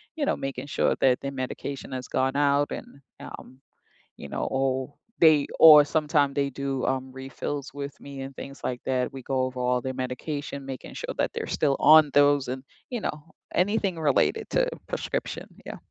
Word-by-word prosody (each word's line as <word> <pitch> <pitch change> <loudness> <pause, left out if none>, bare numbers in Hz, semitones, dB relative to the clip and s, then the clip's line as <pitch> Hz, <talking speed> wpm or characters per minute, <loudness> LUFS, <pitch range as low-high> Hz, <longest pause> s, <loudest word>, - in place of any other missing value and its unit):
you 305 -3 -1
know, - - 0
making 135 0 -5
sure - - +1
that 125 -2 +4
their 140 - -4
medication 135 +1 -5
has 130 -1 -5
gone 130 +1 0
out 145 0 +2
and, 140 - -8 0.2
um, 130 +1 -11 0.6
you - - -8
know, - - -3
oh 130 +1 -1 0.3
they 155 -3 +6
or 150 -2 +10
sometimes 150 -2 +1
they 140 -1 +1
do, 135 -1 -3
um, 130 0 -1
refills 135 +1 -5
with 140 0 -6
me 140 -1 -8
and 135 0 -7
things 140 +1 -9
like 125 -1 -3
that, 130 +1 -1
we 135 - -7
go 130 +1 -1
over 130 0 -4
all 125 0 +1
their 130 +1 -4
medication, 140 +2 -5
making 135 -1 -7
sure - - -5
that - - 0
they're - - -4
still 140 -3 +1
on 155 -1 +7
those 145 -1 +4
and, 130 +1 -4 0.3
you 245 - -3
know, 150 -7 -4 0.3
anything 195 0 +1
related 160 - +2
to - - +2 0.2
prescription, - - -4 0.2
yeah. - - -7
140 Hz, 185 wpm, -26 LUFS, 130-145 Hz, 0.6 s, or